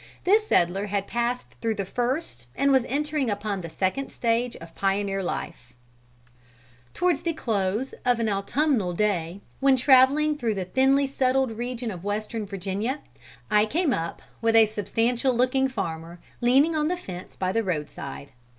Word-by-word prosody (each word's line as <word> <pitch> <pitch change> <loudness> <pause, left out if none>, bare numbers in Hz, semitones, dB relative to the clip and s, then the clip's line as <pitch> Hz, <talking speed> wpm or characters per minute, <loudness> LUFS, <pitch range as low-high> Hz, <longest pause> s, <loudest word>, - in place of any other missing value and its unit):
This 425 +3 +3
settler 190 - +2
had 200 -1 -1
passed 240 +2 -2
through 225 -1 0
the 200 -1 -3
first 240 - -3
and 280 0 +2
was 265 -3 +4
entering 295 -1 -1
upon 205 -1 -2
the 165 - -7
second 190 +11 -2
stage 235 +1 0
of 165 0 -12
pioneer 195 0 0
life: 165 -8 -5 1.2
"Towards 355 -4 +1
the 335 - -1
close 215 -2 -1
of 245 -1 +2
an 230 - 0
autumnal 210 - +1
day, 185 -2 -1 0.2
when 270 0 +5
traveling 270 +4 +5
through 225 -3 0
the 190 -2 -3
thinly 270 +7 +3
settled 265 -1 +1
region 240 +1 -4
of 180 -3 -8
Western 210 +1 -3
Virginia, 200 +8 -3 0.5
I 210 0 +4
came 310 +2 +1
up 165 -3 -4 0.2
with 225 0 +2
a 225 -1 +8
substantial 230 +5 0
looking 255 +2 +2
farmer 170 -8 -5 0.2
leaning 270 +7 +4
on 305 -1 +1
the 360 +2 -1
fence 185 - -9
by 185 -1 -1
the 225 - +1
road 160 -7 -2
side. 140 0 -8
225 Hz, 160 wpm, -25 LUFS, 195-265 Hz, 1.2 s, a